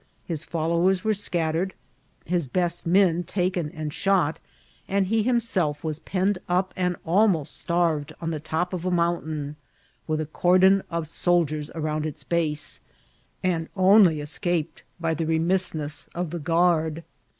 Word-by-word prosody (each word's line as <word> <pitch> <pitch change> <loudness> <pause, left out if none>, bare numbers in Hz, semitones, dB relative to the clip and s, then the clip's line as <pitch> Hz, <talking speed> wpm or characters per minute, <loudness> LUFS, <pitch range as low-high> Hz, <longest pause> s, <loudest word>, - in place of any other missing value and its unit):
His 165 -3 -3
followers 170 +3 +1
were 220 0 +2
scattered, 175 -2 -1 0.5
his 170 -3 0
best 175 +4 -1
men 175 -1 +4
taken 180 -2 -1
and 155 -1 -5
shot, 185 -6 +1 0.5
and 195 0 +1
he 220 +3 +1
himself 210 -11 +1
was 155 -1 -3
penned 190 +2 0
up 185 +1 +1
and 180 -1 0
almost 175 -3 +2
starved 165 -4 0
on 165 -1 -3
the 155 - -3
top 160 +4 -2
of 175 -2 -3
a 185 - 0
mountain, 160 -4 -1 0.5
with 155 -1 0
a 155 - -1
cordon 185 +5 +4
of 165 -2 -3
soldiers 155 -3 0
around 155 -1 -1
its 150 -1 -7
base, 155 -1 -1 0.6
and 170 -3 0
only 185 -4 +5
escaped 160 +2 -2 0.2
by 165 -1 0
the 160 0 -2
re 160 0 +2
missness 165 -3 -1
of 175 -2 -3
the 170 - -4
guard. 165 0 +1
170 Hz, 150 wpm, -25 LUFS, 155-185 Hz, 0.6 s, only